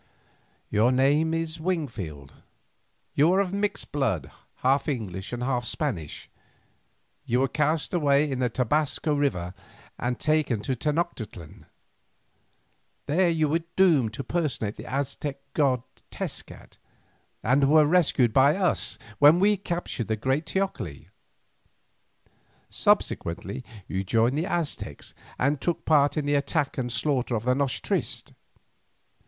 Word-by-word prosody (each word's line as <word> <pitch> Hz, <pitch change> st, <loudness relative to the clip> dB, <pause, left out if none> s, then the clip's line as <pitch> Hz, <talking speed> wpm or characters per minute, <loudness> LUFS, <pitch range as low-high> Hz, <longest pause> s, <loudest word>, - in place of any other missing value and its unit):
"Your 110 Hz, +4 st, +3 dB
name 145 Hz, +5 st, +3 dB
is 165 Hz, 0 st, -1 dB
Wingfield; 115 Hz, -, -4 dB, 0.8 s
you 155 Hz, +5 st, +4 dB
are 190 Hz, -, +3 dB
of 195 Hz, -2 st, 0 dB
mixed 205 Hz, +1 st, -2 dB
blood, 115 Hz, -, -1 dB, 0.3 s
half 135 Hz, +2 st, +2 dB
English 100 Hz, -, -4 dB
and 120 Hz, 0 st, -3 dB
half 125 Hz, -1 st, 0 dB
Spanish. 110 Hz, -, -4 dB, 1.0 s
You 125 Hz, +2 st, +1 dB
were 135 Hz, -, +3 dB
cast 150 Hz, +5 st, 0 dB
away 145 Hz, -3 st, +3 dB
in 130 Hz, -, -2 dB
the 125 Hz, -1 st, +1 dB
Tobasco 150 Hz, +5 st, 0 dB
River 115 Hz, -12 st, -1 dB, 0.5 s
and 120 Hz, +1 st, -2 dB
taken 155 Hz, -7 st, +1 dB
to 130 Hz, +4 st, -2 dB
Tenoctitlan. 145 Hz, -, -4 dB, 1.4 s
There 175 Hz, +5 st, +2 dB
you 160 Hz, -2 st, +2 dB
were 165 Hz, +3 st, +1 dB
doomed 155 Hz, -, +4 dB
to 140 Hz, -, -4 dB
personate 130 Hz, -8 st, -1 dB
the -, -, -9 dB
Aztec 140 Hz, +1 st, -2 dB, 0.2 s
god 130 Hz, -5 st, +2 dB, 0.3 s
Tezcat, -, -, -7 dB, 0.6 s
and 135 Hz, +3 st, +3 dB
were 155 Hz, 0 st, +6 dB
rescued 145 Hz, -8 st, +3 dB
by 140 Hz, +3 st, +5 dB
us 190 Hz, -2 st, +1 dB, 0.2 s
when 150 Hz, +4 st, +7 dB
we 205 Hz, +2 st, +4 dB
captured 175 Hz, -, -4 dB
the 110 Hz, -, 0 dB
great 130 Hz, +8 st, -1 dB
teocalli. 125 Hz, -, -3 dB, 1.6 s
Subsequently 95 Hz, +8 st, 0 dB, 0.2 s
you 95 Hz, +1 st, -2 dB
joined 115 Hz, +6 st, +2 dB
the 160 Hz, +5 st, -1 dB
Aztecs 170 Hz, -5 st, -4 dB, 0.2 s
and 140 Hz, +2 st, +1 dB
took 175 Hz, -, -2 dB
part 145 Hz, -2 st, +3 dB
in 150 Hz, -, 0 dB
the 145 Hz, -, +1 dB
attack 145 Hz, 0 st, 0 dB
and 125 Hz, -1 st, -2 dB
slaughter 125 Hz, +1 st, 0 dB
of 110 Hz, -, -2 dB
the 125 Hz, +1 st, +2 dB
noche 130 Hz, -6 st, -1 dB
triste. -, -, -2 dB
140 Hz, 130 wpm, -26 LUFS, 120-155 Hz, 1.6 s, when